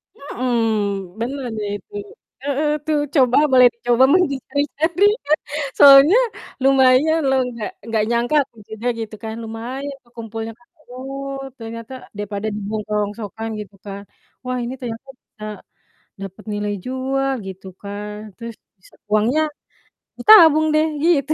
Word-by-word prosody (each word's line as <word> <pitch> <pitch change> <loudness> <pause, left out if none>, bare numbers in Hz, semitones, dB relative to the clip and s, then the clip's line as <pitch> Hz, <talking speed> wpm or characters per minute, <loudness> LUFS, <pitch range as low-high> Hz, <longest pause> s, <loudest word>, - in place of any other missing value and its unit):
Mhm, 220 -7 -2
bener 260 +3 -3
deh 210 -1 -3
itu. 415 - -24 0.5
Heeh, 285 +2 0 0.2
tuh 310 -1 +1 0.2
coba 255 -4 +4
boleh 255 -1 +8
dicoba 240 +1 +2
mencari-cari 295 +2 0 0.7
soalnya 280 - +9 0.5
lumayan 270 +4 +4
loh. 265 0 +3
Nggak 230 -3 -5 0.2
nggak 220 -2 +1
nyangka 240 +4 +1
aku 255 -4 -29
juga 220 +2 -5
gitu 220 -1 -5
kan, 220 0 -5
lumayan 245 +6 -6
ke 240 - -27
kumpulnya 225 0 -5
Kak. 240 - -27 0.2
Oh 275 +2 -6 0.2
ternyata 230 +2 -8 0.2
daripada 205 0 -4
dibuang 210 +1 -4
ke - - -11
rongsokan 210 +2 -4
gitu 205 -1 -9
kan, 200 0 -7 0.4
wah 255 0 -2
ini 240 +2 -4
ternyata 240 0 -6
bisa 215 - -16 0.8
dapet 195 +2 -8
nilai 205 0 -2
jual 265 +1 -1 0.2
gitu 190 0 -9
kan. 205 +1 -6 0.2
Terus 230 -1 -8 0.2
bisa 185 - -21 0.2
uangnya 225 +8 +3 0.8
ditabung 325 -8 +8
deh 310 +1 +3 0.2
gitu. 310 -3 +3
240 Hz, 130 wpm, -20 LUFS, 215-275 Hz, 0.8 s, soalnya